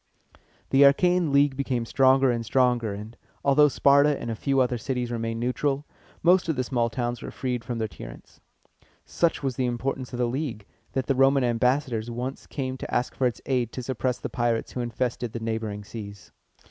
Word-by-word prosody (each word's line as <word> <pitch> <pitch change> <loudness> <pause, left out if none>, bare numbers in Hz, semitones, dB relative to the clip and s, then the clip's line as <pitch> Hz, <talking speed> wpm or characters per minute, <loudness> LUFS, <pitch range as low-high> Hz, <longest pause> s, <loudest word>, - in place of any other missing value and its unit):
The 135 - +4
Achæan 170 +4 +4
League 140 -1 +4
became 130 -3 -1
stronger 135 +1 +4
and 115 -1 -2
stronger; 120 -2 +2
and, 105 +3 -8 0.3
although 145 +2 +6
Sparta 140 +1 +4
and 115 - -4
a - - -3
few 135 +4 0
other 125 -2 +1
cities 125 0 -3
remained 115 -1 -3
neutral, 135 +4 -1 0.4
most 180 +1 +4
of 160 - +1
the 130 - 0
small 120 -2 0
towns 120 +1 -3
were - - -6
freed 125 -3 -3
from 120 0 -4
their 110 -1 -1
tyrants. - - -12 0.6
Such 170 -3 0
was 135 -2 -2
the 130 -2 +1
importance 125 +1 -3
of 125 - -5
the 125 - +1
league, 120 -4 -3 0.3
that 130 -1 -1
the 135 - +1
Roman 135 +1 +4
ambassadors 120 -1 0
once 125 +3 -5
came 130 -2 -4
to - - -7
ask 120 - 0
for 130 - +1
its 120 - -5
aid 125 -4 0
to 130 - -5
suppress 130 0 -1
the - - -5
pirates 120 -2 -1
who 125 - -3
infested 120 0 -3
the 115 - -4
neighboring 110 -2 -3
seas. 100 -1 -9
125 Hz, 195 wpm, -26 LUFS, 115-135 Hz, 0.6 s, although